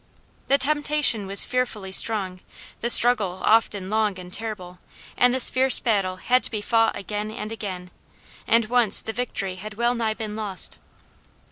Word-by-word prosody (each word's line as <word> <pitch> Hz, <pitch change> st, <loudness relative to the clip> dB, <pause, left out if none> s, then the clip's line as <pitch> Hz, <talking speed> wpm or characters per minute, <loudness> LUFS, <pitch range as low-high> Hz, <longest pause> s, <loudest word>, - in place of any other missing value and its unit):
The 275 Hz, -, +3 dB
temptation 290 Hz, -6 st, +1 dB
was 195 Hz, +1 st, +5 dB
fearfully 235 Hz, -6 st, -3 dB
strong; 190 Hz, -3 st, 0 dB, 0.4 s
the 235 Hz, -, -3 dB
struggle 220 Hz, -7 st, +4 dB
often 210 Hz, -3 st, +1 dB
long 215 Hz, -3 st, 0 dB
and 180 Hz, 0 st, -11 dB
terrible; 185 Hz, -6 st, -7 dB, 0.4 s
and 245 Hz, 0 st, +3 dB
this 255 Hz, 0 st, +3 dB
fierce 260 Hz, 0 st, +4 dB
battle 195 Hz, -5 st, -1 dB
had 250 Hz, +7 st, +1 dB
to -, -, -4 dB
be 215 Hz, -, -4 dB
fought 225 Hz, +2 st, +1 dB
again 210 Hz, +1 st, -5 dB
and 215 Hz, 0 st, -7 dB
again, 185 Hz, -5 st, -7 dB, 0.6 s
and 230 Hz, 0 st, +3 dB
once 235 Hz, -2 st, +3 dB
the 220 Hz, -, -5 dB
victory 195 Hz, -6 st, -4 dB
had 215 Hz, +3 st, -9 dB
wellnigh 235 Hz, -1 st, -1 dB
been 215 Hz, -1 st, -6 dB
lost. 205 Hz, -4 st, -1 dB
215 Hz, 155 wpm, -23 LUFS, 195-240 Hz, 0.6 s, was